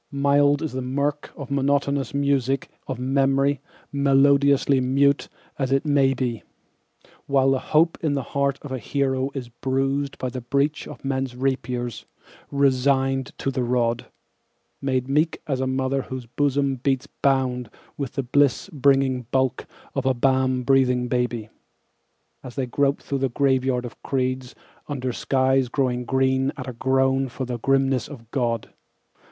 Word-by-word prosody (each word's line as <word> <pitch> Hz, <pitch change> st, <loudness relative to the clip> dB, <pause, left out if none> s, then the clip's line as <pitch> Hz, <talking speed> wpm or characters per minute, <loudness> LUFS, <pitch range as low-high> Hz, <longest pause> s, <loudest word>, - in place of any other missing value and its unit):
Mild 145 Hz, +1 st, +3 dB
is 160 Hz, -, -2 dB
the 130 Hz, -, -3 dB
mirk 140 Hz, +3 st, -2 dB
and 140 Hz, -2 st, -8 dB
monotonous 140 Hz, -1 st, +1 dB
music 140 Hz, -2 st, 0 dB, 0.2 s
of 130 Hz, -, -3 dB
memory, 135 Hz, +2 st, +1 dB, 0.3 s
melodiously 140 Hz, 0 st, +4 dB
mute 140 Hz, +2 st, +2 dB, 0.3 s
as 135 Hz, -1 st, -1 dB
it 135 Hz, +3 st, +2 dB
may 140 Hz, -2 st, +3 dB
be, 125 Hz, -3 st, -2 dB, 0.9 s
While 135 Hz, -1 st, +3 dB
the 135 Hz, -, +2 dB
hope 160 Hz, +4 st, +2 dB
in 150 Hz, -3 st, 0 dB
the 135 Hz, -, -1 dB
heart 140 Hz, +2 st, 0 dB
of 145 Hz, -, -8 dB
a 130 Hz, -, -2 dB
hero 135 Hz, +2 st, 0 dB
is 125 Hz, -3 st, -5 dB
bruised 135 Hz, +3 st, -1 dB
by 130 Hz, -, -3 dB
the 125 Hz, +1 st, -6 dB
breach 140 Hz, +5 st, 0 dB
of -, -, -10 dB
men's 135 Hz, -2 st, -2 dB
rapiers, 125 Hz, -3 st, -2 dB, 0.4 s
resigned 135 Hz, -1 st, +2 dB
to 135 Hz, -, -2 dB
the 130 Hz, -, -2 dB
rod; 120 Hz, -1 st, 0 dB, 0.7 s
Made 130 Hz, -2 st, 0 dB
meek 150 Hz, +4 st, +1 dB
as 135 Hz, -3 st, -1 dB
a 130 Hz, -, 0 dB
mother 130 Hz, +1 st, 0 dB
whose 130 Hz, -1 st, -7 dB
bosom 140 Hz, +2 st, 0 dB
beats 135 Hz, +1 st, 0 dB
bound 130 Hz, -3 st, 0 dB, 0.3 s
with 140 Hz, -4 st, -4 dB
the 135 Hz, +1 st, -2 dB
bliss 140 Hz, +8 st, +2 dB
bringing 135 Hz, -3 st, +2 dB
bulk 130 Hz, -1 st, 0 dB, 0.3 s
of 135 Hz, -1 st, -1 dB
a 130 Hz, -, +3 dB
balm 130 Hz, 0 st, +2 dB
breathing 125 Hz, -2 st, +2 dB
baby, 120 Hz, -3 st, -1 dB, 0.9 s
As 125 Hz, -2 st, -10 dB
they 135 Hz, -2 st, -1 dB
grope 140 Hz, +3 st, 0 dB
through 140 Hz, -, -2 dB
the 135 Hz, 0 st, +1 dB
graveyard 130 Hz, -1 st, +1 dB
of 120 Hz, -, -10 dB
creeds, 130 Hz, -1 st, -2 dB, 0.3 s
under 130 Hz, -4 st, -3 dB
skies 130 Hz, -1 st, +1 dB
growing 125 Hz, -2 st, 0 dB
green 130 Hz, +1 st, +1 dB
at 130 Hz, -1 st, -6 dB
a 125 Hz, -, -4 dB
groan 135 Hz, +2 st, +1 dB
for 130 Hz, +2 st, -5 dB
the 120 Hz, -1 st, -4 dB
grimness 135 Hz, 0 st, +1 dB
of 120 Hz, -6 st, -12 dB
God. 115 Hz, -4 st, -1 dB
135 Hz, 155 wpm, -24 LUFS, 125-140 Hz, 0.9 s, melodiously